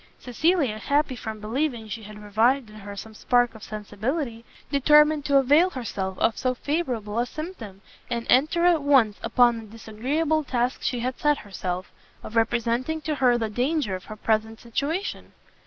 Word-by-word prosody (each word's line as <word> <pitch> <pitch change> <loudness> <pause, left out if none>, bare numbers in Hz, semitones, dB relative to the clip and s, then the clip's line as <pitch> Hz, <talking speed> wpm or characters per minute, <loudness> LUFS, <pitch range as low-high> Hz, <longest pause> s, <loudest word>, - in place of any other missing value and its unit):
Cecilia, 265 -3 0
happy 285 +1 +1
from 220 -2 -6
believing 235 +1 -2
she 225 +2 -6
had 210 0 -10
revived 220 +4 +1
in 215 - -12
her 205 -1 -8
some 220 +2 -9
spark 245 +2 +2
of 220 - -13
sensibility, 225 +4 -4 0.3
determined 300 +1 +5
to 280 -1 +4
avail 290 +7 +5
herself 200 - -4
of 225 - +2
so 255 -1 0
favourable 245 -8 -2
a 240 - 0
symptom, 250 - -8 0.3
and 235 -1 -2
enter 310 +6 +3
at 345 -3 +4
once 260 -8 +3
upon 235 0 +3
the 225 - -10
disagreeable 265 +9 -1
task 250 -2 -1
she 245 -2 -1
had 255 +1 -3
set 295 -1 +3
herself, 185 -2 -5 0.3
of 215 - -9
representing 235 +6 +1
to 310 0 -2
her 255 -4 +3
the 225 -2 -1
danger 245 +1 -1
of 185 0 -5
her 215 - -8
present 220 +1 -1
situation. 290 - -3
240 Hz, 170 wpm, -25 LUFS, 215-285 Hz, 0.3 s, determined